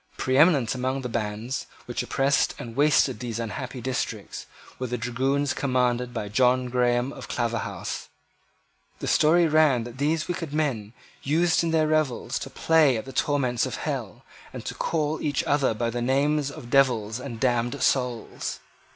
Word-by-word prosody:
Preeminent 135 -2 +3
among 130 +1 -2
the 125 - -4
bands 115 +3 -3 0.2
which 120 - -3
oppressed 135 +1 +1
and 115 -1 -8
wasted 145 -2 +3
these 120 -3 -4
unhappy 125 +3 -5
districts 130 +1 -4 0.3
were 130 - -2
the 125 +1 -2
dragoons 130 +4 0
commanded 125 -2 0
by 115 -4 -4
John 125 +4 +2
Graham 125 +1 +1
of - - -9
Claverhouse. 115 -2 -3 0.9
The - - -6
story 170 +3 +4
ran 150 -6 +4
that 120 +2 -10
these 155 +2 0
wicked 170 -4 -4
men 120 -9 -1 0.3
used 165 +4 +2
in 165 - 0
their 160 -1 +3
revels 155 -5 0
to - - -6
play 155 -6 +3
at 110 - -5
the 135 - -9
torments 130 -5 +1
of - - -4
hell, - - -4 0.3
and - - -8
to - - -3
call 155 -1 -1
each 145 - 0
other 140 -5 +1
by 115 +1 -1
the 120 +1 -3
names 140 +3 +1
of 120 -4 -10
devils 120 -5 +2
and 125 -3 -7
damned 120 +2 0
souls. 125 -4 -1
130 Hz, 160 wpm, -25 LUFS, 120-145 Hz, 0.9 s, story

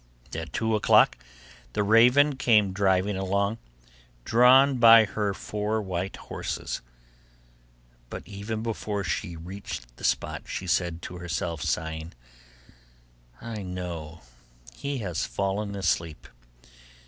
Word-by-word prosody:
At 80 0 -5
two 110 0 -1
o'clock 105 - +5 0.6
the 105 - +1
raven 125 +7 +5
came 110 -6 +3
driving 95 0 +1
along, 100 +3 -1 0.7
drawn 130 +3 +5
by 115 -1 +8
her 105 -1 -2
four 105 +2 -3
white 95 -2 -3
horses; - - -5 1.3
but - - -7
even 105 +2 -5
before 105 -3 -3
she 90 +1 -3
reached 80 -9 -8
the - - -14
spot, - - -1
she 95 - -5
said 85 -1 -1
to 90 - -7
herself, 85 -2 -3
sighing, 80 +1 -3 1.3
'I 115 -3 -6
know 85 -3 -6 0.5
he 140 - -4
has 90 0 -2
fallen 100 +1 -2
asleep. 85 -5 -2
100 Hz, 110 wpm, -26 LUFS, 85-110 Hz, 1.3 s, by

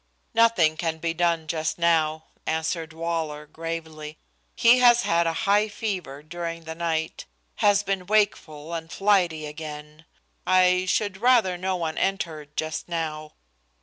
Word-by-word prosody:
"Nothing 205 -9 +4
can 165 -1 -2
be 165 +1 -2
done 170 -2 +1
just 155 0 -2
now," 160 -2 +2 0.2
answered 160 0 -2
Waller, 160 -2 -3
gravely. 160 -1 -7 0.4
"He 240 +2 +5
has 240 -1 +6
had 170 0 +2
high 200 +6 +2
fever 185 -10 -5
during 170 +1 -6
the 160 0 -6
night 160 -1 -3 0.3
has 205 0 +3
been 195 -2 -2
wakeful 170 -7 0
and 165 0 -5
flighty 180 -6 +2
again. 150 0 -9 0.4
I 185 0 +3
should 205 0 0
rather 235 -7 +4
no 185 +1 -2
one 165 -3 -3
entered 160 -6 -3
just 155 +2 -3
now." 155 -2 -4
165 Hz, 135 wpm, -25 LUFS, 155-185 Hz, 0.4 s, has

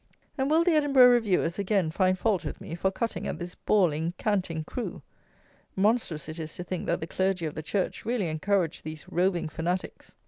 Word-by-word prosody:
And 270 -1 0
will 320 +2 +4
the 350 - +3
Edinburgh 275 -5 +6
Reviewers 200 -7 +2
again 195 -5 +1
find 185 +2 +2
fault 200 -1 +1
with - - -5
me - - -8
for 175 +3 +1
cutting 225 +4 -3
at - - -3
this 175 0 -6
bawling, 170 -4 +1
canting 185 -7 -1
crew? 240 +9 -5 0.7
Monstrous 195 - +1
it 155 +1 -7
is 155 -1 -6
to 180 - -6
think 180 0 -4
that - - 0
the - - -2
Clergy 185 0 0
of 155 - -3
the - - -5
Church 190 +4 -2
really 230 -5 0
encourage 170 +2 0
these 155 0 -7
roving 175 -1 +1
fanatics. 170 +4 -4
185 Hz, 195 wpm, -28 LUFS, 165-215 Hz, 0.7 s, Edinburgh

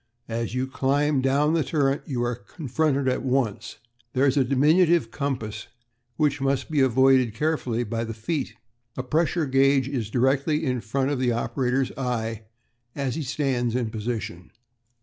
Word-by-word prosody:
As 115 +1 -3
you 130 +1 0
climb 140 +2 +1
down 140 +4 +2
the 165 -2 +2
turret 140 0 +1
you 125 -4 -1
are 120 0 0
confronted 140 +3 -1
with 130 - +3
it - - -1
at - - -7
once. 125 -4 -1 0.4
There 130 +2 +3
is 135 -1 +3
a 140 - +4
diminutive 150 +1 +3
compass 115 -6 -4 0.5
which 145 -2 +1
must 135 +1 0
be 150 - +1
avoided 130 -2 +4
carefully 125 -4 -1
by 115 0 -3
the 115 -1 -5
feet. 135 +6 -3 0.4
A 130 - -2
pressure 160 +4 +1
gauge 135 0 +3
is 125 -6 -3
directly 140 +6 +1
in 125 -3 -1
front 130 +5 -1
of 140 - -1
the 125 -1 +2
operator's 125 +3 0
eye 115 -4 -2 0.5
as 135 -3 -2
he 160 - -3
stands 130 -4 -1
in 120 -3 -1
position. 110 -5 -4
130 Hz, 170 wpm, -25 LUFS, 120-140 Hz, 0.5 s, a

